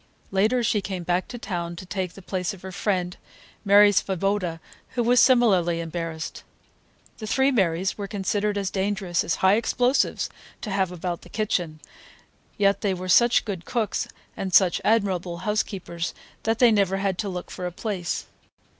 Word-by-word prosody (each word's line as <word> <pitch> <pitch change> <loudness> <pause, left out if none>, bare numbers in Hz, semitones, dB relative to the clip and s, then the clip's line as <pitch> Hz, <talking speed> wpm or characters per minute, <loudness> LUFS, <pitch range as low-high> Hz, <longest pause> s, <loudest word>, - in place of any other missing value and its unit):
Later 215 +6 +2
she 215 -2 +1
came 190 -2 -5
back 180 +2 0
to 245 - -7
town 175 -6 -4
to 180 - -9
take 185 -1 -3
the 195 - -13
place 185 +1 -2
of 185 - -18
her 190 - -6
friend, 180 -2 -1 0.5
Mary 205 0 +7
Svoboda, 190 -3 0 0.4
who 240 - +1
was 245 +1 +4
similarly 195 -11 +4
embarrassed. 165 -1 -5 0.8
The 215 - -6
three 265 +5 +3
Marys 190 -4 0
were 200 - -3
considered 205 +1 -1
as 195 -2 -2
dangerous 195 -3 -1
as 170 - 0
high 195 +2 +6
explosives 245 +3 +1 0.3
to 210 - -5
have 190 -2 0
about 175 -1 -4
the - - -15
kitchen, 175 -7 -2 0.8
yet 200 -1 +2
they 195 -3 0
were 185 0 -6
such 240 +6 +5
good 190 -6 -4
cooks 230 -1 -1 0.3
and 190 -2 -2
such 185 -3 +5
admirable 190 -6 +1
housekeepers 195 -5 -2 0.3
that 225 0 +1
they 240 -1 +6
never 195 -3 +2
had 195 -2 -1
to 205 - -1
look 180 -1 -6
for 180 -1 -4
a - - -5
place. 185 -2 -3
195 Hz, 170 wpm, -25 LUFS, 180-210 Hz, 0.8 s, Mary